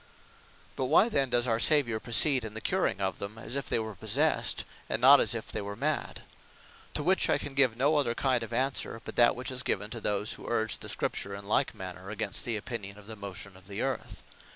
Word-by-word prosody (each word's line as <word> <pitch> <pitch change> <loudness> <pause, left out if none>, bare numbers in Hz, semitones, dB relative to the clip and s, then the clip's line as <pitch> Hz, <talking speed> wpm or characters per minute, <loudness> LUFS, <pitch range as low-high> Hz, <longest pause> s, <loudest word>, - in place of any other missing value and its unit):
But 130 - -1
why 165 - +4
then 135 - +1
does 120 0 +2
our 115 -2 +1
Saviour 120 -5 +3
proceed 125 +3 +4
in 110 -1 -6
the - - -2
curing 100 - 0
of 95 -1 -2
them, 100 +2 -6
as 115 +3 -4
if 140 -2 -3
they - - +2
were 110 -1 -4
possest; 115 - +1 0.2
and - - 0
not - - +8
as - - +3
if - - -6
they - - -3
were 100 0 -6
mad. - - -2 0.7
To - - 0
which - - +2
I - - +3
can 145 - -7
give 130 -5 +3
no 145 +5 +2
other 120 -5 +1
kind 130 -2 +1
of 115 - -6
answer, 130 -1 -1
but - - -6
that 120 -1 +5
which 130 +2 -4
is 130 0 0
given 105 -3 -2
to 115 - -6
those 105 0 0
that - - -11
urge 110 -2 0
the - - -6
Scripture 100 0 -2
in 100 0 -9
like 105 - +1
manner 95 0 -8
against 110 +1 -2
the 115 -2 0
opinion 105 -3 -6
of 105 - -14
the 110 +1 -7
motion 100 -1 -8
of 95 0 -16
the 100 +2 -4
Earth. 135 -1 -4
115 Hz, 235 wpm, -29 LUFS, 100-130 Hz, 0.7 s, not